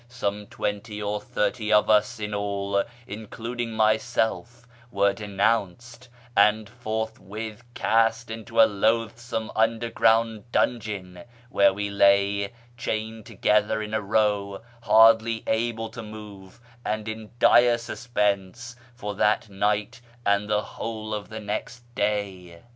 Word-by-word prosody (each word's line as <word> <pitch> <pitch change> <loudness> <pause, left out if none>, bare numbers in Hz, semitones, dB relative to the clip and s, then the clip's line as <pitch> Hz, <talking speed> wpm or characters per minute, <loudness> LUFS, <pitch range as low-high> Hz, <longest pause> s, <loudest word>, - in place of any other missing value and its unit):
Some 105 -4 -3
twenty 105 +1 -4
or 105 0 -2
thirty 105 +1 -1
of 105 - +5
us 110 +2 +3
in 105 0 -4
all, 100 -1 -1 0.2
iiichid 105 +1 -7
iug 120 +2 -4
myself, 110 +2 0 0.2
were 100 -2 +2
denounced, 115 +3 -2 0.3
and 105 +1 +4
forthwith 110 -1 -5
cast 115 +1 +1
into 110 -2 -4
a 110 - +10
loatli 110 +2 +1
some 115 -2 -4
nndcrgronnd 115 0 +2
dungeon, 100 -8 -1 0.3
whore 100 -1 +5
we 100 0 -3
lay, 100 0 +3 0.3
chained 110 -1 -4
togctlicr 105 0 +1
in 105 - -9
a 110 - +1
row, 105 -1 0 0.2
hardly 115 0 +5
able 115 0 -1
to 115 0 -8
move, 105 -2 -11 0.2
and 110 0 -2
in 110 -1 -6
dire 120 0 +5
suspense, 120 -1 -2 0.2
for 105 -4 -5
that 105 +1 +1
night 105 +3 -1 0.2
and 100 +1 +2
the 105 0 +1
whole 110 -1 -6
of 105 -1 -5
the 110 0 -6
next 110 +3 -5
day. 100 -5 -3
110 Hz, 125 wpm, -25 LUFS, 100-115 Hz, 0.3 s, a